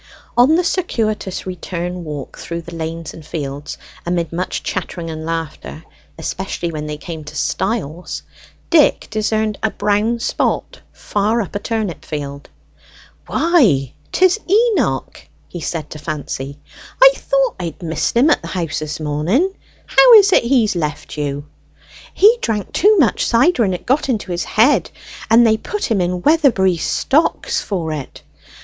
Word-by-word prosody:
On 255 +6 +5
the 355 - +2
circuitous 220 - -2
return 180 -1 -5
walk 150 -4 -7
through 170 0 -5
the 170 - -10
lanes 165 0 -5
and 160 - -11
fields, 145 -2 -5 0.3
amid 170 -1 -2
much 180 +2 -3
chattering 175 -3 -4
and 160 0 -6
laughter, 165 -1 -5 0.3
especially 175 +1 -4
when 150 -1 -5
they 150 0 -4
came 160 0 -7
to 150 +1 -10
stiles, 180 +1 -2 0.5
Dick 315 -4 +4
discerned 215 0 -1
a 220 - +1
brown 210 +3 0
spot 235 - -1
far 210 +3 -1
up 205 - -4
a 205 - -2
turnip 215 -5 -3
field. 140 -2 -6 0.8
"Why, 255 - +3 0.2
'tis 370 +3 +3
Enoch!" 445 +2 +1 0.2
he 175 - -7
said 155 -2 -4
to 155 - -7
Fancy. 145 -2 -5 0.4
"I - - +9
thought - - 0
I 170 -3 -4
missed 165 +7 -1
him 285 +6 +5
at - - +2
the 165 - -8
house 165 -3 -3
this 155 0 -5
morning. 165 - 0 0.3
How - - +6
is 405 -2 +7
it - - +5
he's 235 -5 +2
left 155 -2 -3
you?" 145 -1 -3 0.7
"He 445 +4 +5
drank 210 -4 -2
too 420 +3 +4
much 285 -10 +3
cider, 250 +3 +3
and 190 -3 +1
it - - -9
got 270 +3 +1
into 215 -6 -2
his 175 0 -2
head, 240 +7 +3 0.4
and 230 +2 +6
they 220 -1 +4
put 415 - -4
him 200 -4 +2
in 180 0 -1
Weatherbury 255 - +3
stocks 290 - +1
for 170 -6 -3
it. 145 -4 -7
185 Hz, 155 wpm, -18 LUFS, 160-240 Hz, 0.8 s, I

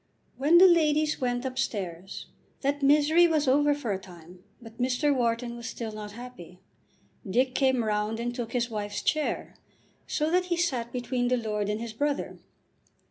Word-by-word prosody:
When 295 +6 +4
the 370 - +9
ladies 310 -4 +2
went 245 0 -1
upstairs 195 -8 -4 0.4
that 285 +1 -1
misery 300 +5 +5
was 310 -3 +1
over 290 +2 +4
for 250 -7 -4
a 190 - -3
time, 180 -2 -14 0.2
but 230 -1 -14
Mr. 260 +3 +1
Wharton 235 -1 -1
was 235 -1 -6
still 230 -1 -5
not 210 -1 -8
happy. 225 -7 -11 0.7
Dick 255 +6 +2
came 260 -2 +2
round 210 +1 -1
and 240 +1 -2
took 240 -2 -5
his 240 -1 -1
wife's 205 -1 -4
chair, 310 -1 -1 0.5
so 305 +1 -1
that 360 +1 +2
he 350 -1 -1
sat 255 -9 -1
between 245 0 -1
the 250 0 +2
lord 210 -3 -2
and 210 +1 -1
his 230 -1 -6
brother. 285 +5 -2
245 Hz, 170 wpm, -27 LUFS, 220-290 Hz, 0.7 s, the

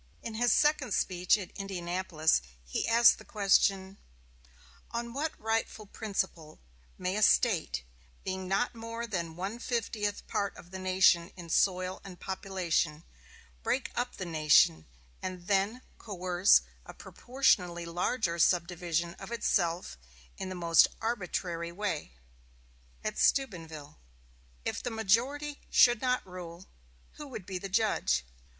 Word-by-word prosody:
In 230 - -5
his 240 +1 +2
second 295 -6 +3
speech 180 +2 +2
at 190 -4 -7
Indianapolis 175 - 0 0.2
he - - -2
asked 235 +1 +6
the - - -11
question: 195 -1 +2 0.9
"On 235 0 -4
what 300 +4 -3
rightful 225 -1 -2
principle 190 -7 -4 0.4
may 185 +1 -2
a 215 - -1
State, 205 - +3 0.4
being 190 0 -4
not 195 +6 0
more 230 0 -5
than 170 -7 -4
one 195 +6 -4
fiftieth 220 -4 -2
part 200 -1 -2
of 175 - -14
the 190 - -6
nation 185 -2 +4
in 170 -2 -9
soil 185 +1 +1
and 185 -2 -11
population, 180 -5 -2 0.6
break 260 - -1
up 245 +1 -2
the 185 - -5
nation, 155 - +4 0.3
and 185 -1 -6
then 200 +6 0 0.2
coerce 185 -2 +3 0.2
a - - -12
proportionally 180 -10 0
larger 175 +1 -1
subdivision 170 -1 +1
of - - -9
itself 175 - 0 0.4
in 190 - -5
the 185 - -5
most 170 -2 +5
arbitrary 180 -6 -3
way?" 175 - -3 0.9
At - - -3
Steubenville: 165 - 0 0.7
"If - - -2
the - - -3
majority 245 +7 0
should 240 -3 +5
not 250 -1 0
rule, 180 -1 -9 0.5
who 300 - -8
would 220 -8 -8
be 185 -1 -4
the 195 - -6
judge? 195 - +1
190 Hz, 130 wpm, -30 LUFS, 175-225 Hz, 0.9 s, asked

